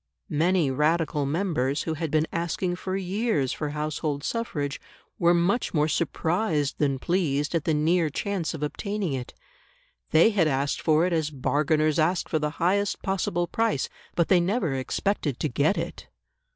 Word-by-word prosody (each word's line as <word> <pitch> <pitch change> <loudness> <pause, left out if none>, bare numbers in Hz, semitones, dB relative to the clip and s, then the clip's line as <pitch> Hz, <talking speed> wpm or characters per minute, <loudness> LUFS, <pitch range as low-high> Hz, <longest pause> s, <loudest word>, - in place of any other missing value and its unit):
Many 165 -1 +2
Radical 150 0 +1
members 150 -4 0
who 160 - -2
had 160 0 -3
been 155 +1 +2
asking 175 +2 -1
for 190 +1 -3
years 190 - 0
for 150 - -3
household 150 -1 -3
suffrage 150 -12 -3 0.4
were 175 0 +4
much 180 +5 +1
more 150 0 +3
surprised 160 -1 0
than 140 -3 +1
pleased 150 -2 0
at 165 -3 0
the 160 - +2
near 160 +2 +2
chance 180 +1 -2
of 150 - -5
obtaining 200 +2 -2
it; 125 -2 -5 0.7
they 165 +8 +5
had 190 -7 +3
asked 140 0 0
for 155 +1 +3
it 180 - 0
as 160 -2 +1
bargainers 155 +2 +1
ask 170 +3 +1
for 155 - 0
the 150 0 0
highest 200 +4 +1
possible 175 -2 0
price, 225 - 0 0.3
but 170 -1 +2
they 185 - +5
never 180 - 0
expected 140 +1 -1
to - - 0
get 145 +8 +1
it. - - -5
160 Hz, 165 wpm, -26 LUFS, 150-180 Hz, 0.7 s, they